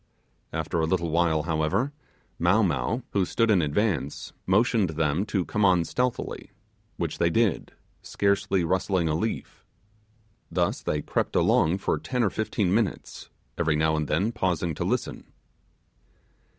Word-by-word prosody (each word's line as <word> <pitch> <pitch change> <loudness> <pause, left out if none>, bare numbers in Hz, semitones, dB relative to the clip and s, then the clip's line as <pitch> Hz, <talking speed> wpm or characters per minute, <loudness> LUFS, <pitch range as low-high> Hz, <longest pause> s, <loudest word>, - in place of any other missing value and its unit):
After 80 +1 -2
a 80 - +1
little 85 -2 0
while, 80 -2 +2
however, 85 - 0 0.5
Mow 90 +6 +4
Mow, 100 - -1
who 100 - +2
stood 115 +5 +1
in 95 -4 +4
advance, 80 - -1
motioned 105 0 +3
them 80 +4 0
to 95 -5 -1
come 105 - -1
on 90 -3 +4
stealthily, 125 +5 -2 0.5
which - - -3
they 85 - +3
did, 110 +1 0 0.3
scarcely 100 -2 0
rustling 95 0 +1
a 80 - +1
leaf. 110 +8 -3 0.9
Thus - - 0
they 75 -1 -2
crept - - -2
along 85 +4 +3
for 95 - -1
ten 125 -2 -1
or 100 - +1
fifteen 105 -4 -1
minutes, 110 -2 -2 0.3
every 80 -3 +2
now 80 +1 +2
and 75 -1 -1
then 95 +9 +1
pausing 90 -6 -1
to - - -3
listen. - - -3
90 Hz, 145 wpm, -26 LUFS, 80-105 Hz, 0.9 s, Mow